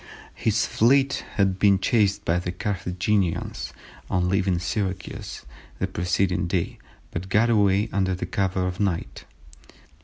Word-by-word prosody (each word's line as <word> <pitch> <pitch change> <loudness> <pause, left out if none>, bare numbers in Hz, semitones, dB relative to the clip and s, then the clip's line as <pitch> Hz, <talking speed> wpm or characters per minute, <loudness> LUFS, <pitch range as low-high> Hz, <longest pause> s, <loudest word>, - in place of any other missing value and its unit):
His 110 0 +1
fleet 135 +4 +3
had 95 -3 +2
been 100 -2 +5
chased 100 0 +1
by 85 +1 +2
the 90 0 -3
Carthaginians 95 -1 -1 0.4
on 90 0 +1
leaving 95 -2 +2
Syracuse 95 - -4 0.3
the - - 0
preceding 90 +1 0
day, 90 -1 -2 0.3
but 90 +3 -5
got 115 +4 +3
away 100 -1 +3
under 95 -2 +1
the 90 - -4
cover 95 0 0
of 90 0 -3
night. 95 -5 -2
95 Hz, 130 wpm, -25 LUFS, 90-105 Hz, 0.4 s, been